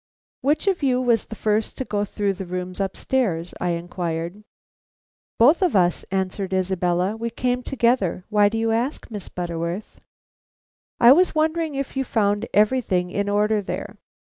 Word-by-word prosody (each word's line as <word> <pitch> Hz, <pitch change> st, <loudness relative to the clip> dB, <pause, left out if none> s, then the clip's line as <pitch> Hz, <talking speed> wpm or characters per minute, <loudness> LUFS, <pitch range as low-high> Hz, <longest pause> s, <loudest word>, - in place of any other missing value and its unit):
"Which 295 Hz, +6 st, +1 dB
of 380 Hz, -4 st, +1 dB
you 255 Hz, -3 st, +2 dB
was 240 Hz, -3 st, +2 dB
the 220 Hz, -, -7 dB
first 215 Hz, 0 st, -1 dB
to 260 Hz, -, -3 dB
go 205 Hz, -2 st, -1 dB
through 200 Hz, 0 st, -1 dB
the 190 Hz, -1 st, -7 dB
rooms 180 Hz, +1 st, -5 dB
upstairs?" 195 Hz, -3 st, -1 dB
I 180 Hz, -1 st, +1 dB
inquired. 170 Hz, +2 st, -4 dB, 1.0 s
"Both 280 Hz, +11 st, +5 dB
of 360 Hz, -, +2 dB
us," 175 Hz, -2 st, +2 dB
answered 190 Hz, 0 st, -2 dB
Isabella. 185 Hz, +1 st, 0 dB
"We 230 Hz, +1 st, -3 dB
came 250 Hz, +1 st, -1 dB
together. 235 Hz, -9 st, 0 dB
Why 210 Hz, -1 st, +4 dB
do 225 Hz, -, -3 dB
you 225 Hz, 0 st, +1 dB
ask, 240 Hz, +3 st, -2 dB
Miss 205 Hz, -3 st, -7 dB
Butterworth?" 170 Hz, +2 st, -5 dB, 1.0 s
"I 235 Hz, +1 st, +8 dB
was 355 Hz, +4 st, +4 dB
wondering 315 Hz, -1 st, 0 dB
if 275 Hz, 0 st, -4 dB
you 270 Hz, -, 0 dB
found 205 Hz, -4 st, 0 dB
everything 205 Hz, -5 st, +2 dB
in 200 Hz, +1 st, -1 dB
order 210 Hz, +1 st, +2 dB
there?" 195 Hz, -, -6 dB
210 Hz, 160 wpm, -23 LUFS, 185-250 Hz, 1.0 s, I